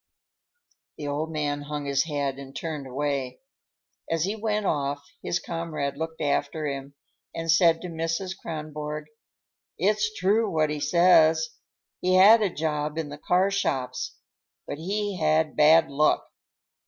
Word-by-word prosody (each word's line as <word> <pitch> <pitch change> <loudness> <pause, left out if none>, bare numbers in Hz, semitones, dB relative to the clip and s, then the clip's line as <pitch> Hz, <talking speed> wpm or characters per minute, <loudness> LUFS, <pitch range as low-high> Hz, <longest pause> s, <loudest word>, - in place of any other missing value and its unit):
The 150 - -6
old 150 +3 -2
man 145 -2 -2
hung 145 0 -5
his 140 +1 +1
head 140 -3 -2
and 135 0 -10
turned 155 -4 -4
away. 135 -1 -2 0.7
As 165 -1 +1
he 200 +4 -1
went 215 -1 -1
off, 145 -3 -1 0.2
his 170 - -1
comrade 165 -5 -4
looked 160 +1 -5
after 145 +1 0
him 140 -1 -5 0.4
and 165 0 0
said 165 -1 +4
to 180 - -5
Mrs. 165 +3 -3
Kronborg: 150 -3 -6 0.7
"It's 210 +4 +1
true, 210 +5 +2
what 155 -3 +1
he 150 - -3
says. 160 -1 +4 0.5
He 185 0 +2
had 210 +5 +8
a 205 - +2
job 150 -2 -2
in 160 -3 -3
the 145 0 -9
car 185 +5 +2
shops; 130 -9 -2 0.5
but 145 - -6
he 200 +2 -2
had 155 0 +2
bad 160 +2 +6
luck." 150 +2 +2
155 Hz, 145 wpm, -26 LUFS, 145-175 Hz, 0.7 s, had